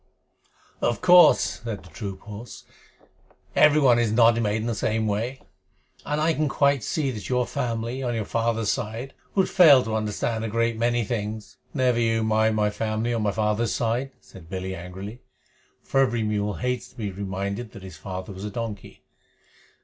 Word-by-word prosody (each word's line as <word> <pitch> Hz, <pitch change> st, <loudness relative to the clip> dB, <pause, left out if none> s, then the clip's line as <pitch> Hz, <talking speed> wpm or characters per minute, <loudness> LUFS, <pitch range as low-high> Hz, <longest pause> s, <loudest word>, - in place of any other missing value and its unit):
"Of 120 Hz, -, +1 dB
course," 180 Hz, -7 st, +5 dB
said 115 Hz, -4 st, -5 dB
the 90 Hz, -, -16 dB
troop 95 Hz, +4 st, -6 dB
horse, 105 Hz, +3 st, -10 dB, 0.9 s
"everyone 140 Hz, -5 st, +5 dB
is 115 Hz, -3 st, +1 dB
not 115 Hz, 0 st, +5 dB
made 105 Hz, -2 st, 0 dB
in -, -, -4 dB
the 120 Hz, -, -1 dB
same 110 Hz, +1 st, -1 dB
way, 115 Hz, +6 st, -2 dB, 0.6 s
and 150 Hz, +1 st, -2 dB
I 160 Hz, +2 st, +2 dB
can 155 Hz, -2 st, 0 dB
quite 140 Hz, -1 st, +2 dB
see 140 Hz, +2 st, -1 dB
that 105 Hz, -5 st, -7 dB
your 125 Hz, -1 st, +1 dB
family, 120 Hz, -1 st, -3 dB
on 120 Hz, -2 st, -1 dB
your 110 Hz, -2 st, -2 dB
father's 115 Hz, -1 st, 0 dB
side, 115 Hz, +5 st, -4 dB, 0.2 s
would 190 Hz, -2 st, +3 dB
fail 150 Hz, -9 st, +7 dB
to 110 Hz, 0 st, -3 dB
understand 110 Hz, +1 st, -2 dB
a -, -, -1 dB
great 115 Hz, +1 st, 0 dB
many 120 Hz, +1 st, +1 dB
things." 110 Hz, -1 st, -4 dB
"Never 125 Hz, -4 st, +1 dB
you 115 Hz, -1 st, +1 dB
mind 110 Hz, 0 st, +2 dB
my 105 Hz, -1 st, +1 dB
family 110 Hz, +2 st, -2 dB
on 115 Hz, -, -1 dB
my 105 Hz, -1 st, +1 dB
father's 105 Hz, +1 st, 0 dB
side," 120 Hz, +3 st, -1 dB
said 85 Hz, -4 st, -15 dB
Billy 95 Hz, 0 st, -4 dB
angrily, 95 Hz, +6 st, -8 dB, 0.6 s
for 135 Hz, -, 0 dB
every 120 Hz, -4 st, +2 dB
mule 105 Hz, -1 st, -1 dB
hates 125 Hz, -1 st, -2 dB
to -, -, -22 dB
be 105 Hz, -5 st, -4 dB
reminded 100 Hz, +3 st, -4 dB
that 100 Hz, -, -11 dB
his 95 Hz, -, -10 dB
father 95 Hz, +1 st, -6 dB
was 95 Hz, +1 st, -9 dB
a 105 Hz, -, -3 dB
donkey. 110 Hz, -1 st, -6 dB
115 Hz, 180 wpm, -25 LUFS, 105-120 Hz, 0.9 s, fail